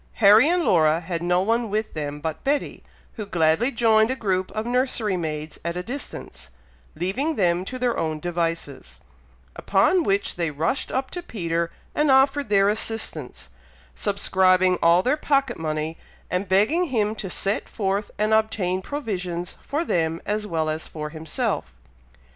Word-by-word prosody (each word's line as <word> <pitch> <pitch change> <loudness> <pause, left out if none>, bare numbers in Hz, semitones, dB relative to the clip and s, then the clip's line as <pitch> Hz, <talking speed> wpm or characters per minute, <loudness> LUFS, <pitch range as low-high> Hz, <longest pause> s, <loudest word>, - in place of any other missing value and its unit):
Harry 215 +7 +6
and 350 0 +2
Laura 160 - +4
had 170 -1 -4
no 180 +1 +2
one 230 +3 0
with 215 +1 -2
them 145 -1 -4
but 160 +1 -4
Betty, 285 +1 -1 0.3
who 215 - -4
gladly 170 +6 +2
joined 220 -3 +3
a 260 - 0
group 190 -6 -1
of 215 +1 -3
nursery 240 -4 0
maids 155 -2 -4
at 170 +1 -3
a 180 - -3
distance, 180 - -7 0.5
leaving 250 - -1
them 175 -4 +2
to 255 - -5
their 250 -2 0
own 155 -1 -2
devices; 165 - -3 0.6
upon 205 - +3
which 200 - 0
they 170 -2 0
rushed 160 - -2
up 260 0 -2
to 355 - -4
Peter 170 - -2 0.2
and 300 0 +2
offered 275 0 +4
their 200 -1 +4
assistance, 210 - -3 0.4
subscribing 185 - +2
all 170 +2 +5
their 255 +4 +2
pocket 275 - 0
money, 155 0 -3 0.3
and 180 +3 -1
begging 215 - +3
him 220 -8 0
to 200 -3 -5
set 195 +3 -1
forth 200 -1 -1
and 215 +1 +1
obtain 205 -4 +1
provisions 185 - -4
for 300 +5 -2
them 165 - 0
as 210 0 -2
well 160 -4 -1
as 155 +1 -3
for 150 -1 -6
himself. 155 - -3
190 Hz, 160 wpm, -24 LUFS, 165-230 Hz, 0.6 s, Harry